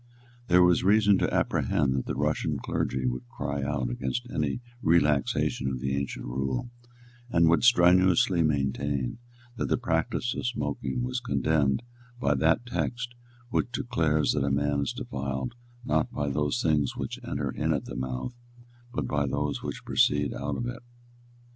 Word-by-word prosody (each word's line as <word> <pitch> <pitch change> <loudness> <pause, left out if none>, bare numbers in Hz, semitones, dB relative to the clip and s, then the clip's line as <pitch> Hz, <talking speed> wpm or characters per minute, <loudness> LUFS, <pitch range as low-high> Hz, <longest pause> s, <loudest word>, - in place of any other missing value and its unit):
There 90 0 +6
was 90 -1 +4
reason 105 0 +5
to - - +1
apprehend 65 -2 +1
that 65 -1 -2
the - - -2
Russian - - 0
clergy 65 0 -2
would 60 -1 -3
cry 70 +1 -3
out 70 +1 -1
against 65 0 -2
any 75 - -1 0.2
relaxation 75 -5 +2
of 65 -1 -2
the 65 +1 -1
ancient 70 0 -3
rule, 65 - -2 0.6
and 85 -6 +4
would 85 +1 +4
strenuously 95 -2 +5
maintain 70 - 0 0.4
that - - -1
the - - +2
practice 120 0 -1
of - - -3
smoking 75 - -2
was 125 0 -2
condemned 75 - +1 0.4
by 70 - +2
that 80 - +2
text 120 0 -3 0.4
which 120 - 0
declares 80 - +1
that 70 -1 0
man 70 +1 +1
is 70 - -1
defiled, 70 - -4 0.3
not 75 +1 +1
by 70 -1 -2
those 75 - 0
things 75 -4 +2
which - - -4
enter - - -2
in - - -1
at - - -1
the - - -7
mouth, 65 - -3 0.6
but 75 - -2
by 70 +2 0
those 70 +2 -1
which - - -6
proceed 75 0 +2
out 70 0 -3
of 120 - -3
it. 120 0 -5
75 Hz, 160 wpm, -28 LUFS, 70-90 Hz, 0.6 s, There